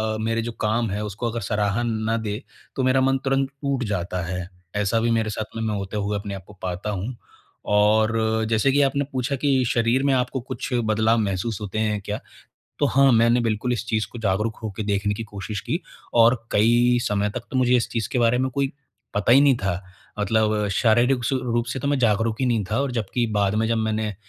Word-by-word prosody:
अ, - - -3
मेरा 115 +1 0
जो 120 +1 -4
काम 110 +1 +1
है, 105 +2 -2
उसको 105 +3 -3
अगर 115 0 -4
सराहन 105 +3 0 0.2
ना 115 - +2
दे, 110 0 -4 0.3
तो 130 - 0
मेरा 130 +1 +3
मन 135 0 +3
तुरंत 135 0 +1
टूट 140 -3 -1
जाता 90 -1 -2
है। 90 0 -4 0.3
ऐसा 105 +2 +1
भी 115 0 +1
मेरे 110 -1 +1
साथ 110 +1 -5
में 115 - -3
मैं 110 -1 -1
होते 100 +1 -4
हुए 105 0 -1
अपने 100 0 -5
आपको 95 +2 -11
पाता 90 +3 -3
हूँ 105 +5 -3 0.5
और 105 +2 +4 0.4
जैसे 115 +4 +3
कि 145 +2 +3
आपने 140 +1 +2
पूछा 130 +2 -1
कि 135 -1 +2
शरीर 115 +3 +2
में 140 - +3
आपको 125 +1 0
कुछ 125 - -6
बदलाव 110 -1 +2
महसूस 100 +1 -2
होते 105 +1 -3
हैं 105 -1 0
क्या? 105 +2 -4 0.6
तो 145 - +3
हाँ, 135 0 +4
मैंने 115 +1 +4
बिल्कुल 115 +1 0
इस 120 -1 -2
चीज़ 110 -1 0
को 120 - -7
जागरूक 105 +1 0
होके 110 -1 -4
देखने 100 0 0
की 115 - -5
कोशिश 105 -1 -6
की - - -2 0.3
और 115 +1 +6 0.2
कई 120 +3 +4
समय 105 -1 0
तक 125 - -2
तो - - -2
मुझे 125 -1 +4
इस 120 - 0
चीज़ 115 -2 -2
के - - +1
बारे 120 0 +3
में 130 +1 0
कोई 140 +2 -1 0.4
पता 105 +3 +3
ही 135 - +8
नहीं 140 -3 +5
था। 95 -3 -2 0.4
मतलब 105 0 +1
शारीरिक 120 +4 +3
स 130 +2 +1
रूप 120 -2 0
से - - -4
तो 140 - -1
मैं 145 -1 +1
जागरूक 115 -2 +2
ही 130 - +2
नहीं 115 -4 +1
था, 110 - +1
और 140 -1 -1
जबकि 120 +1 -1
बाद 100 -1 +2
में 110 +1 +1
जब 115 - +1
मैंने 110 -1 -1
115 Hz, 220 wpm, -23 LUFS, 105-125 Hz, 0.6 s, ही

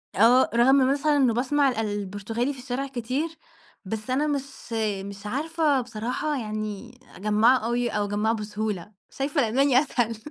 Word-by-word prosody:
آه 240 +5 +5
رغم 245 +3 +5 0.2
مثلًا 290 +2 +2
إنه 260 -5 +3
باسمع 270 +4 +2
ال 250 - -3
البرتغالي 210 +4 -2
في 270 - -12
الشارع 260 +2 -3
كتير، 260 +5 -2 0.6
بس 215 +4 -5
أنا 275 +4 +1
مش 275 -4 -4 0.3
مش 200 0 -9
عارفة 295 +3 +1
بصراحة 245 +6 -3
يعني 215 +2 -5 0.2
أجمّعه 215 +5 +4
أوي 240 +1 -1
أو 210 -2 -1
أجمّعه 210 +2 0
بسهولة، 210 -3 -4 0.2
شايفة 285 +2 -1
الألماني 255 +3 +3
أسهل. 240 -5 -1
240 Hz, 145 wpm, -25 LUFS, 215-275 Hz, 0.6 s, آه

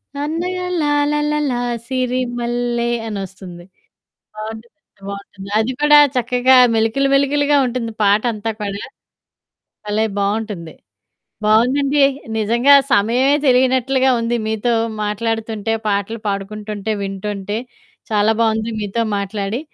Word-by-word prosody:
సన్నగా 345 +5 -3 0.2
లాలాలాల 295 0 +1 0.4
సిరి 255 -1 -1 0.2
మల్లె 240 0 -1 0.2
అనొస్తుంది. 190 -4 -7 0.7
బావుంటుంది, 220 +5 -8 0.3
బావుంటుంది 200 0 -8
అది 230 +4 0
కూడా 295 0 +7 0.2
చక్కగా 250 +1 +3 0.2
మెలికలు 225 +5 +1
మెలికలుగా 285 +1 +3
ఉంటుంది 235 -2 -3
పాటంతా 215 +2 +1
కూడా. 200 0 -4 1.1
భలే! 215 +1 0
బావుంటుంది. 200 -4 -3 0.7
బావుందండి 270 +6 +3 0.4
నిజంగా 235 +6 +4 0.2
సమయమే 245 +7 +3
తెలియనట్లుగా 260 +1 +3
ఉంది 235 +1 0
మీతో 220 +2 0 0.3
మాట్లాడుతుంటే 225 0 -2 0.2
పాటలు 205 +3 -1
పాడుకుంటుంటే, 210 +1 -4
వింటుంటే. 200 +1 -4 0.5
చాలా 210 +1 +3
బావుంది. 220 0 0
మీతో 210 +3 -1
మాట్లాడి. 200 +4 -3
225 Hz, 95 wpm, -18 LUFS, 205-260 Hz, 1.1 s, కూడా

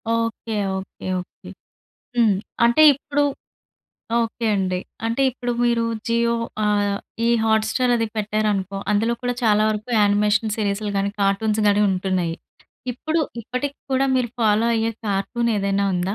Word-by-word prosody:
Okay. 230 0 -2 0.2
Okay. 190 - -10 0.2
Okay. 180 - -11 0.7
హ్మ్. 225 -4 +4 0.3
అంటే 235 +6 +4
ఇప్పుడు 290 +1 -1 1.0
ఓకే 230 0 -2
అండి. 185 -2 0 0.3
అంటే 230 +4 0
ఇప్పుడు 245 -1 -3
మీరు 235 -1 +2 0.3
జియో 235 0 +2 0.3
ఆహ్, 205 -1 +1 0.3
ఈ - - +3 0.2
హాట్‌స్టార్ 220 +3 +2
అది 230 -1 0
పెట్టారనుకో, 210 -2 -1 0.2
అందులో 225 +3 +1
కూడా 245 0 -1
చాలా 215 -2 +4
వరకు 215 +3 -4
యానిమేషన్ 210 +1 +2
సీరీస్‌లు 205 -1 -1
గాని, 195 0 0
కార్టూన్స్‌ 210 +2 +1
గాని 205 +1 +3
ఉంటున్నాయి. 185 -3 -1 0.6
ఇప్పుడు, 315 +6 -1 0.2
ఇప్పటికి 255 +5 -4
కూడా 265 +1 +2
మీరు 245 -3 0
ఫాలో 220 0 +3
అయ్యే 225 0 0
కార్టూనేదైనా 200 -1 0
ఉందా? 180 +3 -1
215 Hz, 130 wpm, -22 LUFS, 200-235 Hz, 1.0 s, హ్మ్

